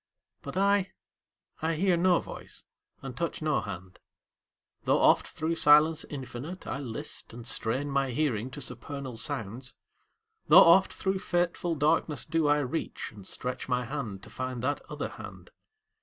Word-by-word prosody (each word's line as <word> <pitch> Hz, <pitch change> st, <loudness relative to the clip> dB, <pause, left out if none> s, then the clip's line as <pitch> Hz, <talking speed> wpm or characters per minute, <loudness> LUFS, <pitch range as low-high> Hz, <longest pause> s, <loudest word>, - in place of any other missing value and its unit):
But 140 Hz, +5 st, -6 dB
I 200 Hz, 0 st, +2 dB, 0.7 s
I 160 Hz, 0 st, 0 dB
hear 185 Hz, +2 st, +3 dB
no 175 Hz, 0 st, +4 dB
voice -, -, -10 dB, 0.4 s
and 135 Hz, -2 st, -6 dB
touch 170 Hz, +5 st, -2 dB
no 155 Hz, -2 st, +1 dB
hand, 95 Hz, -2 st, -8 dB, 0.9 s
Tho' -, -, +4 dB
oft -, -, +4 dB
thro' 160 Hz, +2 st, -2 dB
silence 155 Hz, 0 st, +5 dB
infinite 140 Hz, +5 st, -7 dB
I 135 Hz, -, -3 dB
list, 115 Hz, -3 st, -6 dB
And 120 Hz, 0 st, -9 dB
strain 125 Hz, +6 st, 0 dB
my 135 Hz, -1 st, +1 dB
hearing 125 Hz, -3 st, -1 dB
to 145 Hz, +2 st, -8 dB
supernal 140 Hz, -1 st, -5 dB
sounds; 115 Hz, +3 st, -5 dB, 0.7 s
Tho' -, -, +8 dB
oft 175 Hz, +3 st, +8 dB
thro' 190 Hz, 0 st, -1 dB
fateful 175 Hz, -1 st, 0 dB
darkness 150 Hz, 0 st, +1 dB
do 165 Hz, -2 st, +1 dB
I 145 Hz, 0 st, +4 dB
reach, 145 Hz, +4 st, -4 dB
And 100 Hz, -3 st, -12 dB
stretch 125 Hz, +1 st, -4 dB
my 125 Hz, -1 st, +1 dB
hand 115 Hz, -7 st, -5 dB
to -, -, -11 dB
find 130 Hz, -2 st, -4 dB
that 145 Hz, +3 st, 0 dB
other -, -, -4 dB
hand. -, -, -11 dB
145 Hz, 155 wpm, -29 LUFS, 125-165 Hz, 0.9 s, Tho